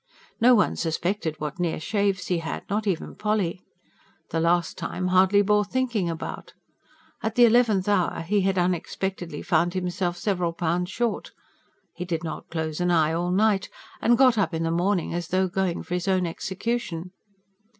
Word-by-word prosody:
No 245 Hz, +2 st, +6 dB
one 210 Hz, -, +2 dB
suspected 165 Hz, 0 st, -1 dB
what 150 Hz, +3 st, -5 dB
near 175 Hz, -2 st, -1 dB
shaves 200 Hz, +1 st, 0 dB
he 180 Hz, -2 st, 0 dB
had 160 Hz, 0 st, -5 dB
not 210 Hz, +1 st, -1 dB
even 180 Hz, -5 st, -2 dB
Polly. 205 Hz, -5 st, -1 dB, 0.7 s
The 165 Hz, -, 0 dB
last 170 Hz, +1 st, +1 dB
time 185 Hz, 0 st, -3 dB
hardly 190 Hz, +2 st, +5 dB
bore 210 Hz, +1 st, +3 dB
thinking 235 Hz, -4 st, -1 dB
about. 165 Hz, -1 st, -6 dB, 0.7 s
At 220 Hz, -1 st, -2 dB
the 245 Hz, -, +7 dB
eleventh 220 Hz, -5 st, +3 dB
hour 200 Hz, -4 st, +1 dB
he 200 Hz, +5 st, +1 dB
had 190 Hz, 0 st, +1 dB
unexpectedly 180 Hz, -2 st, -2 dB
found 170 Hz, +2 st, +1 dB
himself 180 Hz, -1 st, -2 dB
several 180 Hz, -4 st, -1 dB
pounds 175 Hz, +1 st, -1 dB
short. 230 Hz, 0 st, -2 dB, 0.6 s
He 180 Hz, -, -5 dB
did 170 Hz, -2 st, -3 dB
not 160 Hz, -, -6 dB
close 160 Hz, 0 st, -3 dB
an 180 Hz, -, +1 dB
eye 160 Hz, -2 st, +3 dB
all 175 Hz, +2 st, -1 dB
night, 200 Hz, +1 st, +2 dB, 0.3 s
and 240 Hz, +1 st, +4 dB
got 255 Hz, -4 st, +5 dB
up 170 Hz, -5 st, 0 dB
in 160 Hz, -, -1 dB
the 165 Hz, -, 0 dB
morning 175 Hz, +1 st, 0 dB
as 175 Hz, -1 st, -3 dB
though 185 Hz, +2 st, +1 dB
for 190 Hz, +1 st, 0 dB, 0.3 s
his 180 Hz, +1 st, -2 dB
own 185 Hz, -2 st, +2 dB
execution. 190 Hz, 0 st, -3 dB
185 Hz, 170 wpm, -25 LUFS, 170-205 Hz, 0.7 s, the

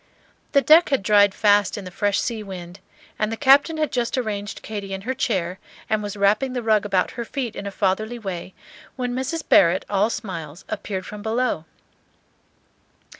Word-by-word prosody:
The 280 Hz, -2 st, +4 dB
deck 320 Hz, +3 st, +6 dB
had 275 Hz, -8 st, +1 dB
dried 205 Hz, -1 st, +5 dB
fast 205 Hz, -1 st, +3 dB
in 200 Hz, -, -7 dB
the 185 Hz, -, -8 dB
fresh 205 Hz, +2 st, 0 dB
sea 230 Hz, -3 st, -2 dB
wind, 185 Hz, -2 st, -9 dB, 0.4 s
and 215 Hz, +1 st, 0 dB
the 225 Hz, -, -3 dB
Captain 285 Hz, +4 st, +5 dB
had 305 Hz, -2 st, 0 dB
just 245 Hz, 0 st, -1 dB
arranged 210 Hz, -4 st, -4 dB
Katy 200 Hz, -3 st, -5 dB
in 190 Hz, -, -7 dB
her 250 Hz, +6 st, -2 dB
chair, 190 Hz, -8 st, -1 dB, 0.3 s
and 215 Hz, -1 st, +2 dB
was 205 Hz, -1 st, -5 dB
wrapping 210 Hz, +6 st, +2 dB
the 245 Hz, -2 st, -3 dB
rug 215 Hz, -2 st, +2 dB
about 190 Hz, -2 st, +1 dB
her 240 Hz, -, -5 dB
feet 245 Hz, -1 st, -4 dB
in 200 Hz, -, -5 dB
a -, -, -4 dB
fatherly 215 Hz, +4 st, -1 dB
way, 190 Hz, -4 st, -6 dB, 0.4 s
when 250 Hz, -2 st, -3 dB
Mrs. 270 Hz, +6 st, -3 dB
Barrett, 185 Hz, 0 st, +5 dB
all 205 Hz, +2 st, +2 dB
smiles, 170 Hz, -8 st, -6 dB
appeared 195 Hz, -3 st, -4 dB
from 210 Hz, 0 st, -8 dB
below. 220 Hz, -6 st, -1 dB
210 Hz, 180 wpm, -23 LUFS, 195-245 Hz, 0.4 s, deck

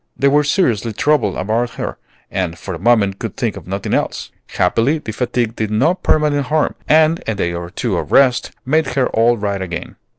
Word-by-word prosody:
They 140 Hz, -, +3 dB
were 145 Hz, +1 st, +4 dB
seriously 120 Hz, -, +1 dB
troubled 125 Hz, -6 st, +1 dB
about 115 Hz, +5 st, -1 dB
her, -, -, -5 dB, 0.3 s
and 90 Hz, -3 st, -2 dB
for 95 Hz, -, -6 dB
the 85 Hz, -, -10 dB
moment 100 Hz, -5 st, +3 dB
could -, -, -5 dB
think -, -, -1 dB
of -, -, -10 dB
nothing -, -, -3 dB
else. -, -, -2 dB, 0.2 s
Happily 115 Hz, -, +1 dB
the 150 Hz, -7 st, -6 dB
fatigue 120 Hz, 0 st, -1 dB
did 110 Hz, -1 st, -2 dB
no 125 Hz, +11 st, +2 dB
permanent 150 Hz, -6 st, +1 dB
harm, 155 Hz, +1 st, +1 dB, 0.2 s
and 155 Hz, +2 st, +4 dB
a 110 Hz, -, 0 dB
day 85 Hz, -3 st, -1 dB
or 85 Hz, 0 st, -5 dB
two -, -, -2 dB
of -, -, -4 dB
rest 130 Hz, -3 st, +4 dB, 0.2 s
made 155 Hz, +5 st, +2 dB
her 135 Hz, -2 st, +3 dB
all 115 Hz, +1 st, +3 dB
right 100 Hz, -2 st, -2 dB
again. 90 Hz, -2 st, -6 dB
120 Hz, 200 wpm, -18 LUFS, 100-145 Hz, 0.3 s, were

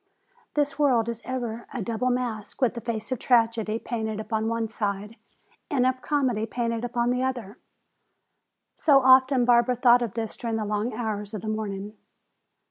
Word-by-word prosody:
This 290 Hz, -1 st, 0 dB
world 250 Hz, -6 st, +3 dB
is 235 Hz, -1 st, -4 dB
ever 240 Hz, -3 st, -4 dB
a 265 Hz, -, -4 dB
double 230 Hz, +4 st, -1 dB
mask 240 Hz, -4 st, -3 dB
with 255 Hz, -3 st, +2 dB
the 235 Hz, -, -6 dB
face 220 Hz, -1 st, -4 dB
of 255 Hz, -, -1 dB
tragedy 225 Hz, -3 st, +2 dB
painted 220 Hz, -2 st, -4 dB
upon 220 Hz, 0 st, -2 dB
one 230 Hz, 0 st, -1 dB
side 210 Hz, 0 st, -3 dB, 0.5 s
and 260 Hz, -3 st, +2 dB
of 255 Hz, 0 st, 0 dB
comedy 260 Hz, -7 st, 0 dB
upon 235 Hz, 0 st, -1 dB
the 250 Hz, 0 st, 0 dB
other. 245 Hz, -5 st, -3 dB, 1.1 s
So 275 Hz, -3 st, +4 dB
often 260 Hz, 0 st, +6 dB
Barbara 240 Hz, +1 st, +4 dB
thought 245 Hz, 0 st, +5 dB
of 235 Hz, -4 st, -3 dB
this 225 Hz, -2 st, -3 dB
during 230 Hz, -2 st, -3 dB
the 220 Hz, -1 st, -2 dB
long 210 Hz, +3 st, -1 dB
hours 215 Hz, -2 st, -4 dB
of 200 Hz, -, -6 dB
the -, -, -5 dB
morning. 210 Hz, -1 st, -4 dB
235 Hz, 165 wpm, -26 LUFS, 220-250 Hz, 1.1 s, often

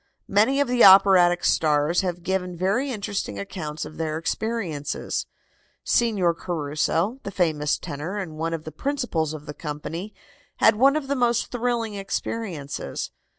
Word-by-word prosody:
Many 220 Hz, +8 st, +3 dB
of 285 Hz, -, +2 dB
the 245 Hz, 0 st, +3 dB
operatic 190 Hz, -2 st, +7 dB
stars 150 Hz, +3 st, +2 dB
have 175 Hz, -2 st, -3 dB
given 180 Hz, -1 st, -2 dB
very 200 Hz, +10 st, 0 dB
interesting 205 Hz, -3 st, -3 dB
accounts 155 Hz, -6 st, -5 dB
of 155 Hz, 0 st, -10 dB
their 155 Hz, -1 st, -2 dB
experiences. 170 Hz, -5 st, -3 dB, 0.6 s
Signor 205 Hz, -8 st, +2 dB
Caruso, 165 Hz, -, -1 dB
the 200 Hz, -, -6 dB
famous 155 Hz, -6 st, 0 dB
tenor 155 Hz, +8 st, -5 dB
and 180 Hz, -6 st, -5 dB
one 165 Hz, +1 st, -2 dB
of 160 Hz, -, -8 dB
the 155 Hz, -, -7 dB
principals 170 Hz, -, -2 dB
of 150 Hz, -1 st, -10 dB
the 150 Hz, -, -7 dB
company, 165 Hz, +6 st, -6 dB, 0.4 s
had 220 Hz, -, +5 dB
one 270 Hz, +6 st, +4 dB
of 305 Hz, -3 st, -2 dB
the 280 Hz, -, 0 dB
most 240 Hz, -3 st, +1 dB
thrilling 240 Hz, -2 st, -1 dB
experiences. 195 Hz, -6 st, -4 dB
180 Hz, 150 wpm, -24 LUFS, 155-225 Hz, 0.6 s, operatic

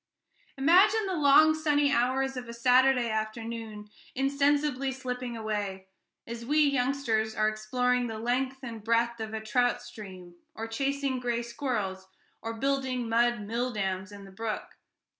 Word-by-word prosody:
Imagine 375 Hz, +10 st, +5 dB
the 380 Hz, -, -2 dB
long 305 Hz, +1 st, +6 dB
sunny 295 Hz, -2 st, +2 dB
hours 265 Hz, +2 st, +1 dB
of 250 Hz, -2 st, -6 dB
a -, -, -6 dB
Saturday 250 Hz, +1 st, +4 dB
afternoon 220 Hz, -1 st, -4 dB, 0.3 s
insensibly 280 Hz, 0 st, +1 dB
slipping 250 Hz, -2 st, -5 dB
away, 205 Hz, -3 st, -4 dB, 0.4 s
as 235 Hz, 0 st, -7 dB
we 290 Hz, +6 st, 0 dB
youngsters 250 Hz, -5 st, 0 dB
are 215 Hz, 0 st, +2 dB
exploring 245 Hz, +3 st, 0 dB
the 225 Hz, -1 st, -5 dB
length 255 Hz, +4 st, -1 dB
and 230 Hz, -4 st, -7 dB
breadth 230 Hz, +1 st, +1 dB
of 220 Hz, 0 st, -4 dB
a -, -, -2 dB
trout 245 Hz, +3 st, +1 dB
stream, 185 Hz, -4 st, -11 dB, 0.2 s
or 225 Hz, -, -4 dB
chasing 275 Hz, +2 st, -1 dB
gray 240 Hz, -1 st, -1 dB
squirrels, 215 Hz, -7 st, -3 dB, 0.3 s
or 225 Hz, 0 st, -5 dB
building 260 Hz, -1 st, -1 dB
mud 235 Hz, 0 st, +2 dB
milldams 210 Hz, -4 st, -2 dB
in 200 Hz, -1 st, -10 dB
the 195 Hz, -, -13 dB
brook. 215 Hz, +2 st, -5 dB
240 Hz, 140 wpm, -28 LUFS, 220-270 Hz, 0.4 s, long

